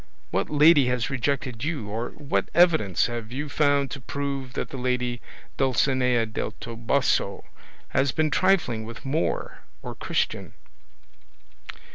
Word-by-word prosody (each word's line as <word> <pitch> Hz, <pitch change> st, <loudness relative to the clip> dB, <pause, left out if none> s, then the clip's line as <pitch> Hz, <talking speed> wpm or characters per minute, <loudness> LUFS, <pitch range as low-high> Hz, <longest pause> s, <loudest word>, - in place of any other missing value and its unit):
What -, -, 0 dB
lady 150 Hz, -2 st, +6 dB
has 125 Hz, -2 st, -1 dB
rejected 130 Hz, -2 st, -2 dB
you, 150 Hz, -9 st, -2 dB
or 115 Hz, +4 st, -3 dB
what 145 Hz, -1 st, -1 dB
evidence 160 Hz, -, +4 dB
have 120 Hz, -1 st, -5 dB
you 140 Hz, +4 st, -3 dB
found 145 Hz, -1 st, +2 dB
to 140 Hz, -, -6 dB
prove 140 Hz, -1 st, -4 dB
that -, -, -3 dB
the 135 Hz, -, -6 dB
lady 125 Hz, -1 st, -1 dB, 0.4 s
Dulcinea 130 Hz, -2 st, +2 dB
del 110 Hz, -, -4 dB
Toboso 115 Hz, +4 st, 0 dB, 0.5 s
has 135 Hz, -1 st, +2 dB
been 155 Hz, +1 st, 0 dB
trifling 175 Hz, -13 st, +2 dB
with 115 Hz, +3 st, -9 dB
Moor 150 Hz, +5 st, -1 dB, 0.2 s
or -, -, -5 dB
Christian?" -, -, -2 dB
130 Hz, 130 wpm, -25 LUFS, 120-145 Hz, 0.5 s, lady